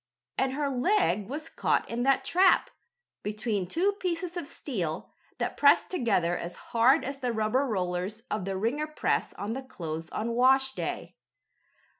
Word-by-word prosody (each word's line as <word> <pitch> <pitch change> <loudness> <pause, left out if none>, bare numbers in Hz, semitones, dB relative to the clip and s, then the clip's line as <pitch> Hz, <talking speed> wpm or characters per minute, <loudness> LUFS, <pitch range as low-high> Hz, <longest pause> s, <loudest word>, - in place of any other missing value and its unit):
And 265 0 0
her 290 +1 -1
leg 255 - +1
was 300 +4 -4
caught - - 0
in 235 +1 -3
that 265 +1 +2
trap, 370 +5 +4 0.5
between 210 -2 -2
two 360 - +2
pieces 350 -1 -2
of 345 -5 -4
steel, 180 - -4 0.2
that - - -2
pressed - - +5
together 200 - +1
as 175 0 -5 0.2
hard 250 +6 +5
as 275 +1 -5
the 250 -2 -1
rubber 225 +5 +1
rollers 185 0 -2
of 210 -4 -1
the 195 -1 -2
wringer 255 +10 -1
press 305 - 0
on 205 +2 -4
the 265 - -4
clothes 165 -10 -6
on 230 +2 -2
washday. 265 +2 +1
245 Hz, 155 wpm, -28 LUFS, 205-280 Hz, 0.5 s, pressed